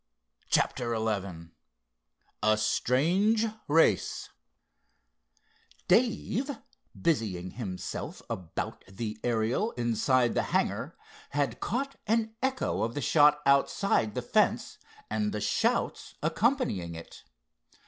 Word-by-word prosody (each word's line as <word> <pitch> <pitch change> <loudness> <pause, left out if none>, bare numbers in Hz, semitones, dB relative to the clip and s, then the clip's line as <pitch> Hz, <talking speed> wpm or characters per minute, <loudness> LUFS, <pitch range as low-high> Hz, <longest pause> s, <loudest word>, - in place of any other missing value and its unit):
CHAPTER 120 -1 +1
XI 100 -7 -3 0.9
A 110 0 +3
STRANGE 170 - +2 0.2
RACE 160 +3 +2 1.6
Dave, 245 +2 +2 0.5
busying 100 - 0
himself 95 -7 -6
about 90 -3 -5
the 105 +3 -5
Ariel 120 - 0
inside 120 +1 +2
the - - +2 0.2
hangar, - - -2 0.4
had 140 -5 0
caught 275 +5 -2
an 220 0 +1
echo 265 0 0
of 115 +1 -1
the - - -1
shot 150 +3 +4
outside 140 - +2
the - - -2
fence - - +1 0.3
and 105 -1 -1
the 105 - -2
shouts - - 0
accompanying 160 - 0
it. 80 - -11
120 Hz, 95 wpm, -29 LUFS, -, 1.6 s, shot